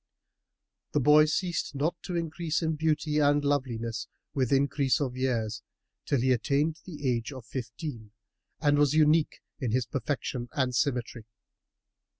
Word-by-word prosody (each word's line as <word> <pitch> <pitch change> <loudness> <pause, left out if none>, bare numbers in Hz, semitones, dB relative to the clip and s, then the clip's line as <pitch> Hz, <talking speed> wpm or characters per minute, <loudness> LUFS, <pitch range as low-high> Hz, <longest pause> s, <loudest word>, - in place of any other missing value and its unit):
The 150 - +3
boy 150 +3 +6
ceased 170 -1 -1
not 155 +5 0
to 180 - -4
increase 165 0 -1
in 160 -1 0
beauty 155 0 +1
and 145 0 +3
loveliness 115 -6 -1 0.3
with 130 -4 0
increase 140 -1 +2
of 130 -4 -2
years, 115 -4 -1 0.5
till 140 -5 +2
he 130 +1 +3
attained 145 +5 +1
the 150 -6 -5
age 120 +1 0
of 130 -4 -9
fifteen 120 0 -6 0.5
and 145 -1 +3
was 145 0 +3
unique 155 0 +3 0.2
in 130 -5 -1
his 125 +2 +1
perfection 125 0 -3
and 130 -3 0
symmetry. 120 -3 -1
140 Hz, 145 wpm, -28 LUFS, 125-150 Hz, 0.5 s, boy